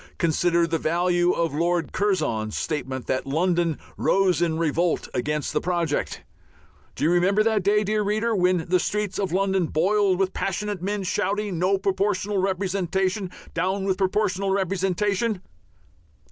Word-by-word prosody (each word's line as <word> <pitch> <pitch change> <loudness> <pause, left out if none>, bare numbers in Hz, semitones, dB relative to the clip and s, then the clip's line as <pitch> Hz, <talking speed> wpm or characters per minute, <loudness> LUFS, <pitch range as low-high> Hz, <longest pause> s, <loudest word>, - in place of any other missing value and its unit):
Consider 170 +1 +2
the 165 -1 -1
value 175 +2 +2
of 165 -4 -1
Lord 170 +2 0
Curzon's 155 - 0
statement 130 -5 -3
that 130 - -2
London 170 +2 +1 0.2
"rose 190 -3 +2
in 165 -2 +1
revolt" 165 +1 0
against 150 +4 -2
the - - +1
project. 170 -4 -1 0.7
Do - - -4
you 160 - +3
remember 190 +4 +3
that 220 -2 +2
day, 210 +3 +2
dear 215 +1 0
reader, 215 +2 0
when 180 -3 +2
the 180 +1 +3
streets 210 +1 -2
of 195 -3 -1
London 190 -1 +1
boiled 190 +4 +2
with 190 0 0
passionate 200 0 -3
men 200 +1 -2
shouting, 200 0 -1
"No 190 +2 +2
Proportional 195 +1 0
Representation! 190 0 -1 0.2
Down 190 +2 -1
with 190 -1 0
Proportional 195 0 0
Representation"? 195 +2 0
185 Hz, 145 wpm, -24 LUFS, 170-200 Hz, 0.7 s, you